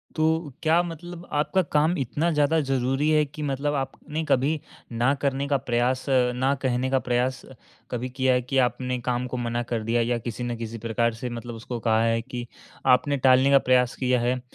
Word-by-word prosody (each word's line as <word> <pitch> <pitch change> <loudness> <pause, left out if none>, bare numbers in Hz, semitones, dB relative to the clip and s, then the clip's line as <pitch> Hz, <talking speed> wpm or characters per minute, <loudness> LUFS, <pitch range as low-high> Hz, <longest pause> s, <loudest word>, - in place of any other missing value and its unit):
तो 160 -1 +1
क्या 165 +2 +4
मतलब 175 +1 -8
आपका 150 +6 +1
काम 155 +4 +3
इतना 145 +6 0
ज़्यादा 150 +1 +2
ज़रूरी 135 +1 0
है, 150 -1 +4
कि 150 +2 -9
मतलब 145 +1 -1
आपने 150 +3 -4
कभी 145 +3 +1 0.3
ना 120 +4 +2
करने 140 0 0
का 140 - +3
प्रयास 125 +2 +1 0.3
ना 130 +3 +1
कहने 130 0 0
का 135 - +3
प्रयास 125 +1 +1 0.5
कभी 125 +1 -3
किया 130 0 +1
है 125 - +1
कि 135 +2 -1
आपने 125 +1 -3
काम 125 0 -1
को 125 - -4
मना 120 0 -2
कर 115 -2 0
दिया 115 +2 +1
या 120 +1 0
किसी 120 +1 -5
न 120 -1 -3
किसी 115 0 -6
प्रकार 115 +1 0
से 125 - -2
मतलब 120 0 -6
उसको 120 +2 -6
कहा 110 -1 +2
है 115 0 +2
कि 120 0 -6 0.5
आपने 140 +3 0
टालने 130 +1 +5
का 140 - +7
प्रयास 125 -1 +2
किया 125 -1 +1
है? 125 +2 0
130 Hz, 200 wpm, -25 LUFS, 120-145 Hz, 0.5 s, का